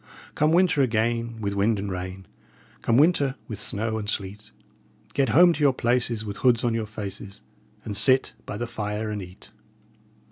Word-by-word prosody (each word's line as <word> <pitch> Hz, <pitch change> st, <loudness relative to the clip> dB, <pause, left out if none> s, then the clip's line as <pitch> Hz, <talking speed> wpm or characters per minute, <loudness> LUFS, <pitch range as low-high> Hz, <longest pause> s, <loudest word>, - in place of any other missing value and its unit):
Come 150 Hz, +1 st, +2 dB
winter 175 Hz, -4 st, +3 dB
again, 115 Hz, -1 st, 0 dB
with 100 Hz, -1 st, -2 dB
wind 100 Hz, +2 st, +1 dB
and 100 Hz, 0 st, -4 dB
rain 95 Hz, +1 st, -6 dB, 0.6 s
Come 115 Hz, -, +2 dB
winter, 145 Hz, -3 st, +3 dB
with 110 Hz, -, -6 dB
snow 110 Hz, +2 st, -3 dB
and 105 Hz, -1 st, -5 dB
sleet, 100 Hz, +1 st, -5 dB, 0.6 s
Get 135 Hz, -3 st, +1 dB
home 170 Hz, +8 st, +6 dB
to 155 Hz, -, -7 dB
your 145 Hz, -3 st, +4 dB
places, 120 Hz, -2 st, 0 dB
with 100 Hz, -1 st, -6 dB
hoods 125 Hz, -2 st, +3 dB
on 120 Hz, -2 st, +1 dB
your 115 Hz, -1 st, -2 dB
faces, 100 Hz, -1 st, -8 dB, 0.4 s
And 105 Hz, -, -4 dB
sit 130 Hz, +7 st, +4 dB
by 105 Hz, -, -5 dB
the 120 Hz, -, -3 dB
fire 110 Hz, -2 st, -4 dB
and 105 Hz, -1 st, -4 dB
eat." 90 Hz, 0 st, -12 dB
110 Hz, 175 wpm, -25 LUFS, 105-125 Hz, 0.6 s, home